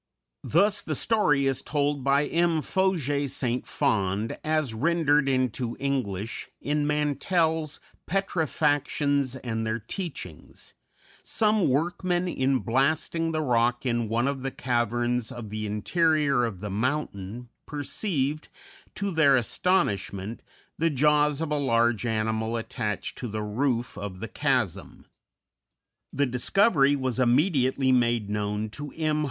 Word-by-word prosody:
Thus 200 +6 +2
the - - -3
story 150 -12 +2
is 135 -2 0
told 145 -2 -1
by 140 +2 +3
M. 165 -1 +1
Faujas 145 -8 0
St. 125 -1 -2
Fond, 105 -5 0
as 155 -6 0
rendered 145 +2 +2
into 130 -2 -1
English, 120 -7 -2
in 145 0 -1
Mantell's 155 +2 0 0.3
"Petrifactions 145 -6 0
and 115 -2 -2
their 110 0 -1
Teachings": 115 - -8 0.5
"Some 215 -6 +2
workmen, 175 +5 0
in 135 -5 +1
blasting 155 +6 +1
the 155 -1 -1
rock 120 +1 +1
in 120 -3 0
one 120 +3 +1
of 140 -1 -2
the 135 - -2
caverns 120 -1 -1
of 120 -5 -8
the 110 0 -3
interior 140 - +2
of 100 -5 -5
the 105 -1 -4
mountain, 120 -1 -3 0.2
perceived, 150 0 -2 0.5
to 200 -1 -2
their 155 -5 +5
astonishment, 110 - 0 0.4
the 165 +1 +3
jaws 150 +1 +2
of 160 -2 -2
a 150 - +1
large 120 -3 +2
animal 110 +1 -1
attached 105 -2 -4
to 125 - -4
the 110 -1 -4
roof 120 +3 -1
of 100 -2 -6
the 115 - -5
chasm. 105 - -1 1.1
The 140 - +1
discovery 140 - +3
was 130 -2 -2
immediately 130 0 +3
made 120 -4 +2
known 105 +1 -2
to 145 +4 -7
M. 155 -1 0
135 Hz, 125 wpm, -26 LUFS, 115-150 Hz, 1.1 s, their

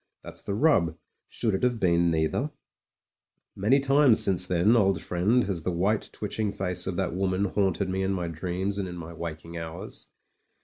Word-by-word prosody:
That's - - -6
the 100 - -3
rub; 105 - +2 0.3
should 110 -3 -1
it 95 - -1
have 125 -2 +1
been 85 -2 +3
neither? 80 - 0 1.1
Many 110 +8 +3
times 135 -3 +4
since 90 -1 +5
then, 90 +6 +3
old 95 -4 +3
friend, 105 +8 +1
has 95 -4 -3
the 85 - -2
white 95 +5 0
twitching 105 0 -3
face 90 -2 -3
of 95 - -2
that 95 -2 -1
woman 95 +1 0
haunted 95 -1 0
me 95 +1 -2
in 95 0 0
my 90 -3 -2
dreams 90 +4 -3
and 95 - -2
in 90 0 -7
my 85 0 -8
waking 85 0 -7
hours. 85 +5 -7
95 Hz, 180 wpm, -27 LUFS, 85-105 Hz, 1.1 s, since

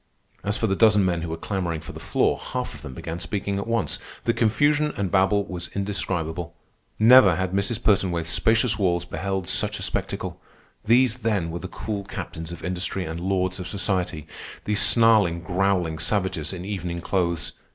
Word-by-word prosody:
As 100 +1 -1
for - - 0
the 95 -3 +1
dozen 105 -2 +5
men 85 -2 0
who 85 - -4
were 80 - -4
clamoring 85 -3 -2
for 75 - -9
the - - -9
floor, - - +1
half - - -4
of - - -11
them 65 - -8
began 80 +5 -5
speaking 100 0 -2
at 100 - -5
once. 115 0 0 0.2
The 115 - +2
confusion 145 +7 +2
and 95 -3 -1
babel 100 +1 +3
was 85 -2 -5
indescribable. 90 -4 -3 0.4
Never 110 -5 +7
had 95 0 -1
Mrs. 100 +4 -1
Pertonwaithe's 95 -5 +2
spacious 110 +3 +2
walls 85 -3 +1
beheld 95 -1 -3
such - - 0
a - - -4
spectacle. - - -3 0.4
These, 120 +2 +4
then, 105 -8 0
were 85 - -4
the 95 - -6
cool 100 +2 -5
captains 80 -3 -6
of 85 - -9
industry 90 +1 -1
and 80 +1 -5
lords 95 0 0
of 90 - -5
society, 90 -5 -1 0.4
these 105 -1 +2
snarling, 105 -5 +4
growling 90 -2 0
savages 95 -6 0
in 90 -1 -6
evening 90 -4 -4
clothes. 85 -3 0
95 Hz, 180 wpm, -24 LUFS, 85-105 Hz, 0.4 s, Never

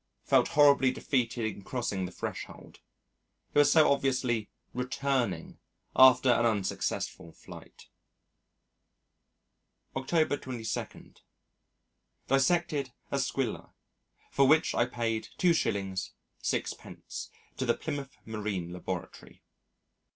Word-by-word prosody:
Felt - - +4
horribly 140 -3 +5
defeated 125 -3 -1
in 105 -2 -4
crossing 105 -5 -2
the - - -10
threshold. - - -7 0.7
It - - +4
was 145 - +6
so 155 -3 +6
obviously 130 -5 0 0.2
returning 130 0 -2 0.4
after 130 0 +7
an 120 - +3
unsuccessful 100 -5 -1
flight. - - -13 2.1
October 145 +2 +1
22. 120 -5 -6 1.1
Dissected 140 0 +1 0.2
a 140 - 0
Squilla 135 -3 -2 0.6
for 140 -1 +4
which 155 +3 +4
I 120 - +2
paid 115 -2 -2
2s. 100 - 0 0.3
6d. - - -4 0.3
to - - -1
the - - +2
Plymouth 140 -2 -5
Marine 105 -6 -4
Laboratory. 90 - -7
125 Hz, 95 wpm, -30 LUFS, 110-140 Hz, 2.1 s, after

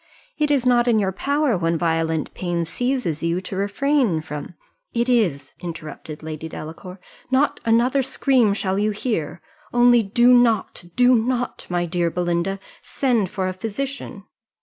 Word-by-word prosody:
It 300 -1 +2
is 275 -4 +2
not 245 -1 +4
in 235 -2 +4
your 195 -3 +1
power, 280 +5 0
when 165 -1 0
violent 165 -1 -1
pain 175 -2 -2
seizes 245 - -2
you, 170 +1 0
to 190 +1 -6
refrain 205 - +1
from 150 +2 -7 0.2
" - - -49
"It 235 +1 +1
is," 175 - +1
interrupted 155 -2 -8
Lady 160 0 -6
Delacour; 175 +5 -9 0.3
"not 265 +3 +2
another 240 +4 +3
scream 255 -5 +2
shall 190 -1 -1
you 210 +1 +2
hear 210 - -3 0.3
only 240 0 +5
do 240 +4 +4
not, 230 -7 +2
do 250 0 +5
not, 245 +1 -1
my 175 -1 0
dear 175 0 0
Belinda, 175 +2 -1 0.2
send 235 -8 0
for 190 -1 -2
a 185 - -2
physician." 225 +2 -5
200 Hz, 155 wpm, -22 LUFS, 170-245 Hz, 0.3 s, only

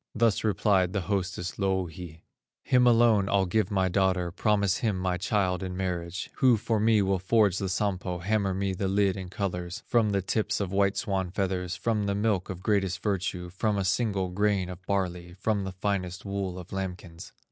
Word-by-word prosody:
Thus 115 -2 +2
replied 100 -3 +2
the 100 - 0
hostess, 95 -1 -3
Louhi: 90 -4 -3 0.4
"Him 125 -1 +4
alone 115 -4 +4
I'll 100 -1 +3
give 95 +2 +1
my 95 -2 +1
daughter, 95 -1 +1
Promise 100 0 +1
him 110 -5 0
my 90 -1 -1
child 95 -1 0
in 90 -1 -4
marriage, 90 -1 -3
Who 125 -3 +5
for 110 +1 0
me 110 -1 +4
will 95 -1 +1
forge 100 0 +3
the 95 - -2
Sampo, 95 -2 -1
Hammer 100 +1 0
me 95 0 -1
the 95 +1 -2
lid 100 -1 +2
in 95 -2 -6
colors, 90 0 -4
From 115 -3 +2
the 100 -2 0
tips 105 +3 0
of 100 -3 -2
white 100 0 +2
swan 95 -2 -1
feathers, 90 -1 -2
From 105 +3 -1
the 100 - 0
milk 105 -3 0
of 95 -1 -6
greatest 95 -4 0
virtue, 90 -3 -2
From 105 +3 0
a 100 - 0
single 95 -1 0
grain 100 -1 0
of 90 0 -9
barley, 90 -3 -2
From 100 +1 -1
the 95 - -4
finest 95 -1 -3
wool 100 -2 -3
of 90 0 -9
lambkins." 90 -3 -6
95 Hz, 190 wpm, -28 LUFS, 90-105 Hz, 0.4 s, Who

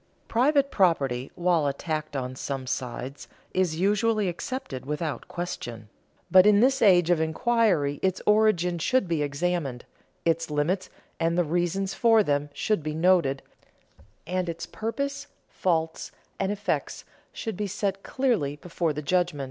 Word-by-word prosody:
Private 275 +3 +2
property, 140 - +1
while 175 -4 +2
attacked 155 +1 -3
on 130 -1 -3
some 135 -1 -4
sides, 125 +2 -5 0.3
is 175 -4 0
usually 210 +1 +2
accepted 175 - -5
without 150 +2 -4
question; 120 -11 -6 0.4
but 185 +1 +8
in 205 -1 +6
this 265 +3 +3
age 180 -5 +5
of 165 -2 +3
inquiry 160 - +1
its 190 -1 0
origin 210 -5 +3
should 255 +4 +1
be 165 -3 0
examined, 145 -3 -2 0.4
its 165 0 +1
limits 160 +6 0 0.3
and 165 +1 +1
the 175 - +4
reasons 175 +4 -1
for 225 -2 +4
them 145 -3 0
should 210 +5 0
be 155 0 -4
noted, 165 -5 +2 0.8
and 180 +1 -2
its 170 0 -5
purpose, 280 +10 -4 0.2
faults, 165 -3 -1 0.3
and 195 0 0
effects 205 0 -3 0.3
should 225 -4 -5
be 210 +2 -2
set 195 0 -2
clearly 225 - 0
before 165 +1 -2
the 150 +1 -5
judgment. 175 -1 +1
175 Hz, 140 wpm, -26 LUFS, 150-200 Hz, 0.8 s, but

